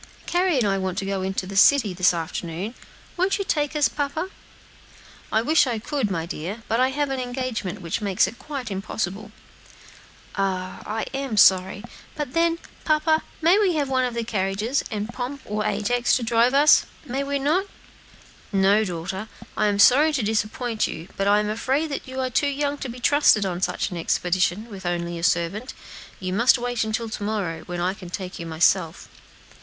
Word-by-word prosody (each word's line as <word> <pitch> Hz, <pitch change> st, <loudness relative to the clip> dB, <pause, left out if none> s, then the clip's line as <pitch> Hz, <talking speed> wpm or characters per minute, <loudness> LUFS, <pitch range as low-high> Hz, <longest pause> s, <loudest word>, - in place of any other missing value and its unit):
"Carry 355 Hz, -3 st, +1 dB
and 235 Hz, -5 st, +2 dB
I 195 Hz, -1 st, +1 dB
want 190 Hz, -1 st, -3 dB
to 195 Hz, -, -2 dB
go 190 Hz, -1 st, -2 dB
to 190 Hz, -, -3 dB
the 195 Hz, +1 st, -7 dB
city, 215 Hz, -1 st, +5 dB
this 180 Hz, 0 st, +4 dB
afternoon; 170 Hz, +4 st, -4 dB, 0.4 s
won't 370 Hz, +2 st, +2 dB
you 395 Hz, -, -3 dB
take 295 Hz, -3 st, 0 dB
us, 295 Hz, -2 st, +4 dB
papa?" 300 Hz, +6 st, -3 dB, 1.0 s
"I 220 Hz, -, +2 dB
wish 300 Hz, +1 st, +4 dB
I 240 Hz, -3 st, -1 dB
could, 255 Hz, 0 st, -2 dB
my 165 Hz, -4 st, -2 dB
dear, 185 Hz, +7 st, -6 dB
but 225 Hz, -, +1 dB
I 255 Hz, +1 st, +4 dB
have 285 Hz, +1 st, -1 dB
an 265 Hz, -, -2 dB
engagement, 245 Hz, -6 st, -3 dB
which 170 Hz, +5 st, -2 dB
makes 200 Hz, -3 st, +2 dB
it 235 Hz, -, -7 dB
quite 275 Hz, -7 st, -6 dB
impossible." 195 Hz, +1 st, -4 dB, 1.0 s
"Ah, 195 Hz, +3 st, -2 dB
I'm 270 Hz, -5 st, -3 dB
so 195 Hz, -1 st, +8 dB
sorry! 190 Hz, +3 st, -8 dB, 0.3 s
but 295 Hz, -4 st, -4 dB
then, 335 Hz, 0 st, +2 dB, 0.3 s
papa, 315 Hz, 0 st, +2 dB, 0.2 s
we -, -, -2 dB, 0.2 s
may -, -, +1 dB
have 285 Hz, -3 st, 0 dB
one 260 Hz, -1 st, +2 dB
of 245 Hz, -2 st, -2 dB
the 235 Hz, -, -1 dB
carriages, 210 Hz, +3 st, -1 dB
and 215 Hz, +1 st, -4 dB
Pomp 260 Hz, +2 st, -5 dB
or 210 Hz, +1 st, -2 dB
Ajax 215 Hz, +4 st, +1 dB
to 250 Hz, -, -1 dB
drive 235 Hz, +3 st, +3 dB
us, 295 Hz, +2 st, +6 dB, 0.2 s
may 270 Hz, +1 st, -2 dB
we 280 Hz, 0 st, -1 dB
not?" 305 Hz, +8 st, +1 dB, 0.9 s
"No, 200 Hz, +2 st, +4 dB
daughter; 190 Hz, +2 st, -4 dB, 0.3 s
I 215 Hz, -, +2 dB
am 205 Hz, -1 st, +1 dB
sorry 285 Hz, +9 st, +6 dB
to 265 Hz, -6 st, 0 dB
disappoint 220 Hz, +2 st, -1 dB
you, 165 Hz, +4 st, -7 dB
but 195 Hz, -, -1 dB
I 205 Hz, +1 st, +5 dB
am 210 Hz, -, -1 dB
afraid 275 Hz, +7 st, -1 dB
you 260 Hz, 0 st, -6 dB
are 255 Hz, -1 st, -2 dB
too 285 Hz, +4 st, +2 dB
young 285 Hz, 0 st, -2 dB
to 265 Hz, -, -4 dB
be 245 Hz, +1 st, -8 dB
trusted 265 Hz, -6 st, +4 dB
on 180 Hz, -1 st, -3 dB
such 195 Hz, -, -1 dB
an 175 Hz, -, -5 dB
expedition 180 Hz, +5 st, 0 dB
with 200 Hz, -4 st, -10 dB
only 170 Hz, -1 st, -2 dB
a -, -, -8 dB
servant. 180 Hz, +9 st, 0 dB, 0.4 s
You 185 Hz, -1 st, -3 dB
must 235 Hz, +6 st, +4 dB
wait 245 Hz, -1 st, -1 dB
until 220 Hz, +1 st, -2 dB
to 220 Hz, -, -6 dB
morrow, 200 Hz, -6 st, -2 dB
when 175 Hz, -1 st, -4 dB
I 180 Hz, +2 st, 0 dB
can 185 Hz, -3 st, -10 dB
take 185 Hz, 0 st, -6 dB
you 170 Hz, -, -5 dB
myself." 165 Hz, +1 st, +1 dB
220 Hz, 190 wpm, -24 LUFS, 190-270 Hz, 1.0 s, so